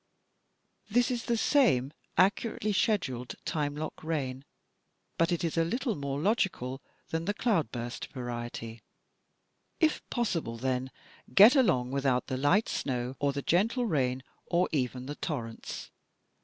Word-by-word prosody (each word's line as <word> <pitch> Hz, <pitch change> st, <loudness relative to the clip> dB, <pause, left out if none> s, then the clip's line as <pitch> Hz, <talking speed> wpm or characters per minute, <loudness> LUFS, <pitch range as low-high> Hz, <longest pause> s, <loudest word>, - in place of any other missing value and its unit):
This 245 Hz, +4 st, +3 dB
is 240 Hz, -2 st, -2 dB
the 235 Hz, -, +1 dB
same 185 Hz, -, +3 dB, 0.2 s
accurately 210 Hz, +2 st, +2 dB
scheduled, 130 Hz, -, 0 dB
time 145 Hz, -3 st, -1 dB
lock 155 Hz, +1 st, -5 dB
rain, 140 Hz, -4 st, -2 dB, 0.7 s
but 165 Hz, +1 st, +3 dB
it 175 Hz, -, 0 dB
is 165 Hz, -1 st, -1 dB
a -, -, +4 dB
little 240 Hz, -, -1 dB
more 140 Hz, -3 st, -3 dB
logical 160 Hz, -, 0 dB, 0.3 s
than 165 Hz, 0 st, -2 dB
the 205 Hz, +2 st, -1 dB
cloudburst 130 Hz, -, -1 dB
variety. 120 Hz, -2 st, -6 dB, 1.0 s
If 320 Hz, -2 st, +2 dB
possible, 170 Hz, -, -1 dB
then, 130 Hz, +1 st, -1 dB, 0.5 s
get 215 Hz, +8 st, +9 dB
along 130 Hz, -, +3 dB
without 135 Hz, -2 st, +1 dB
the 130 Hz, -, -3 dB
light 160 Hz, +11 st, +3 dB
snow 125 Hz, -1 st, -2 dB
or 145 Hz, -1 st, +2 dB
the 140 Hz, 0 st, -4 dB
gentle 225 Hz, +8 st, +2 dB
rain 130 Hz, -, 0 dB, 0.2 s
or 175 Hz, +1 st, +2 dB
even 130 Hz, -3 st, -1 dB
the 145 Hz, -, -4 dB
torrents. 120 Hz, -9 st, -5 dB
145 Hz, 135 wpm, -30 LUFS, 130-205 Hz, 1.0 s, get